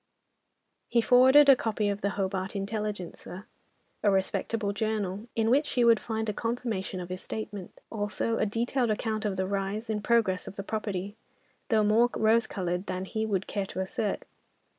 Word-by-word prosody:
He 235 - +3
forwarded 260 +5 +7
a 275 - +9
copy 220 -3 -1
of 200 0 -2
the 200 - +1
Hobart 190 0 -2
Intelligencer, 200 -2 -5 0.6
a 210 - +3
respectable 200 +2 0
journal, 210 -1 -2
in 225 0 +2
which 290 +4 +3
she 245 -3 +1
would 230 -1 +6
find 220 -1 -3
a 210 - -1
confirmation 230 -5 -3
of 175 0 -6
his 185 0 -5
statement. 205 -4 -7
Also, 220 +1 -1
a 215 - +2
detailed 235 +3 0
account 215 0 -1
of 200 -2 0
the 190 0 -1
rise 200 +3 -2
and 210 -1 -2
progress 215 -6 +2
of - - -8
the 200 - -5
property, 205 -2 -3 0.5
though 220 -2 +4
more 220 +3 +4
rose 225 +1 +3
coloured 180 -1 -3
than 185 +1 -3
he 220 +3 -2
would 195 -3 -1
care 200 -2 -3
to - - -6
assert. 190 +2 -2
210 Hz, 175 wpm, -28 LUFS, 195-225 Hz, 0.6 s, a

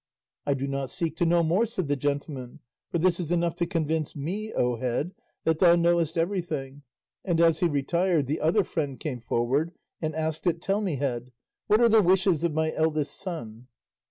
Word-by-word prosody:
"I 140 - +2
do 135 +1 -3
not 140 -1 -3
seek 170 -4 -2
to 175 - +2
know 170 0 +4
more," 180 +8 +2
said 185 -7 -3
the 145 - +1
gentleman, 140 -2 -3 0.3
"for - - -1
this 175 +1 +2
is 170 -2 -3
enough 170 -1 +1
to 170 -1 0
convince 160 -3 -1
me, 195 +10 -4
O 125 -1 0
Head, 130 +9 -2 0.3
that 160 -1 +1
thou 175 -2 +7
knowest 170 -1 +2
everything;" 165 -6 -2 0.4
and 175 -4 0
as 165 -1 +4
he 175 - +3
retired 165 +2 +1
the 145 +4 -2
other 180 +6 +3
friend 145 -6 -3
came 135 -6 -4
forward 130 +8 0 0.3
and 155 -1 -2
asked 160 +2 -2
it, 170 -1 +1
"Tell 195 +4 0
me, 185 -7 -1
Head, 125 -3 -3 0.4
what 215 - +4
are 235 - +7
the 220 -1 +6
wishes 185 -3 +3
of 170 - +2
my 155 +1 0
eldest 155 -2 0
son?" 125 - -6
160 Hz, 195 wpm, -27 LUFS, 140-175 Hz, 0.4 s, thou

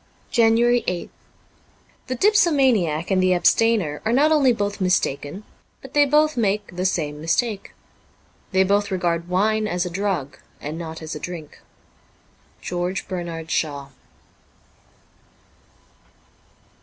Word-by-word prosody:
JANUARY 235 0 +3
8th 180 -1 -3 1.0
THE 255 - -2
dipsomaniac 260 - +2
and 185 -1 +3
the 185 0 +3
abstainer 180 -3 +2
are 220 - 0
not 290 +6 +3
only 285 -5 +4
both 205 -3 -2
mistaken, 180 -1 -1 0.4
but 270 - -13
they 290 -1 +4
both 305 +1 +3
make 205 -4 -1
the 185 +1 0
same 150 -5 -3
mistake. 200 +6 -1 0.8
They 190 -1 +4
both 200 +2 +1
regard 170 -2 -1
wine 215 +4 +1
as 180 -2 -1
a 180 - -5
drug 175 -8 -3 0.2
and 150 +2 -6
not 160 -1 -7
as 160 - -6
a - - -6
drink. 170 -4 -8 0.6
' - - -35
George 180 +2 -3
Bernard 170 -3 -5
Shaw.' 140 -3 -2
190 Hz, 125 wpm, -22 LUFS, 170-230 Hz, 1.0 s, only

